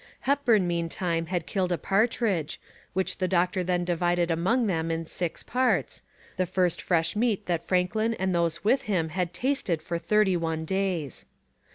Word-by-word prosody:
Hepburn 250 -9 +3
meantime 170 0 -1
had 175 -1 -2
killed 185 -2 -1
a 175 - +1
partridge, 200 -5 0 0.3
which 190 +1 -1
the 185 - +1
doctor 180 0 +1
then 175 0 0
divided 175 0 +1
among 190 +10 +2
them 165 -5 0
in 165 0 -2
six 170 +1 -3
parts, 255 +1 0 0.4
the 185 - +1
first 180 -1 +1
fresh 165 0 +1
meat 215 -2 +1
that 170 -2 -1
Franklin 215 +5 +1
and 190 -2 -1
those 170 -1 0
with 240 +6 +3
him 170 -5 +1
had 175 +1 -2
tasted 185 - -1
for 170 0 -3
thirty 200 +2 +2
one 160 -1 -2
days. 185 -6 -2
180 Hz, 165 wpm, -27 LUFS, 170-200 Hz, 0.4 s, Hepburn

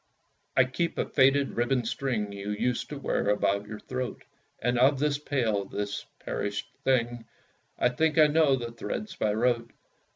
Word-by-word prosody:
I 130 - +8
keep 150 +7 -2
a - - +1
faded 135 0 +4
ribbon 120 0 +1
string 115 -3 -1
You 100 0 -6
used 115 +4 -1
to 150 - -5
wear 140 - 0
about 100 0 +1
your 105 0 -7
throat; 130 -1 -5 0.3
And 120 +1 0
of 135 +3 +5
this 145 +1 +1
pale, 115 -9 0
this 100 +1 -4 0.2
perished 100 0 -2 0.2
thing, 120 -3 +1 0.5
I - - +3
think 160 +5 +1
I 155 - +8
know 150 -2 +4
the 120 -2 -5
threads 155 - -5
by 105 - +1
rote. 120 0 +1
125 Hz, 165 wpm, -28 LUFS, 105-140 Hz, 0.5 s, I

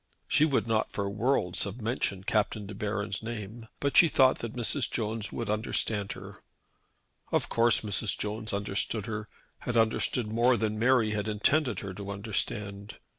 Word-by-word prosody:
She 155 - +4
would 140 -6 +1
not 110 -1 +1
for 100 -1 -2
worlds 100 -3 +1
have 100 +4 -6
mentioned 105 -4 -2
Captain 105 0 0
De 100 - -7
Baron's 105 0 -3
name; 115 0 -6
but 140 -1 -1
she 170 - +8
thought 130 -4 +4
that 115 0 -5
Mrs. 125 +3 0
Jones 110 -1 -2
would 115 - -4
understand 105 -1 -1
her. - - -11 0.9
Of - - +1
course 115 0 +3
Mrs. 105 0 -1
Jones 110 +1 -3
understood 100 +1 -1
her, 105 -2 -4 0.3
had 120 -1 -2
understood 115 0 +1
more 120 +2 +4
than 110 -1 -1
Mary 120 -2 +3
had 105 -1 -2
intended 115 - +1
her 95 -1 -6
to 100 +1 -7
understand. 100 0 -3
110 Hz, 165 wpm, -29 LUFS, 100-115 Hz, 0.9 s, she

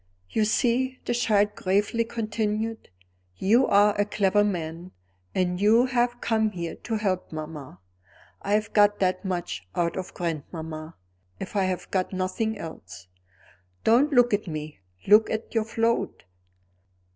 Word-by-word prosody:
"You 220 - +2
see," 250 +4 +1
the - - 0
child 210 -3 +2
gravely 205 +5 +1
continued, 220 -1 -3 0.5
"you 230 +7 +3
are 205 +1 +5
a - - +4
clever 205 0 +2
man; 175 -2 -4 0.4
and 180 0 0
you 225 +4 +5
have 245 -1 0
come 220 -1 +1
here 170 -4 -5
to 225 - -4
help 195 -4 -1
mamma. 155 - -7 0.6
I 200 - -1
have 210 0 0
got 205 0 +5
that 185 -1 0
much 175 - -4
out 170 -1 0
of 185 -1 -6
grandmamma, 160 -1 -5 0.4
if 195 - -7
I 195 -2 +2
have 185 -1 -3
got 185 0 -1
nothing 190 +4 -1
else. 95 - -10 0.7
Don't 255 +7 +4
look 245 -4 +4
at 205 0 0
me; 155 - -6 0.3
look 210 +2 +6
at 220 +1 -4
your 225 -2 +1
float. 230 +1 -1
205 Hz, 145 wpm, -26 LUFS, 180-225 Hz, 0.7 s, look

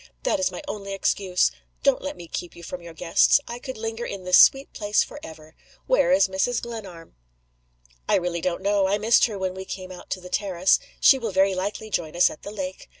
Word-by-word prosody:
That 315 -12 +1
is 285 - +1
my - - -8
only 200 -6 -5
excuse. 190 -2 +1 0.3
Don't 275 -2 +3
let 285 +1 -5
me 170 - -10
keep 175 +1 -6
you 170 - -12
from 180 +1 -7
your 170 -1 -11
guests. 165 - +4
I 240 +1 -6
could 260 -1 -7
linger 225 +1 -4
in 200 -5 -6
this 180 0 +5
sweet 270 +1 +5
place 210 0 +1
forever! 160 0 -11 0.3
Where 390 - +3
is 280 -5 +5
Mrs. 190 +6 0
Glenarm?" 195 - -9 0.9
"I - - +4
really 175 -2 -1
don't 180 +2 -2
know. 200 -1 +2
I 200 +2 +1
missed 220 +3 +4
her 215 -4 -4
when 190 -1 -2
we 190 0 -7
came 185 -1 -7
out 185 +1 -6
on 185 - -15
the 180 - -9
terrace. 185 -1 +2 0.2
She 270 - +6
will 230 -3 -3
very 190 +1 +3
likely 205 +3 -4
join 165 -4 -2
us 175 - +4
at - - -12
the - - -8
lake. 190 -3 -6
195 Hz, 220 wpm, -24 LUFS, 180-225 Hz, 0.9 s, She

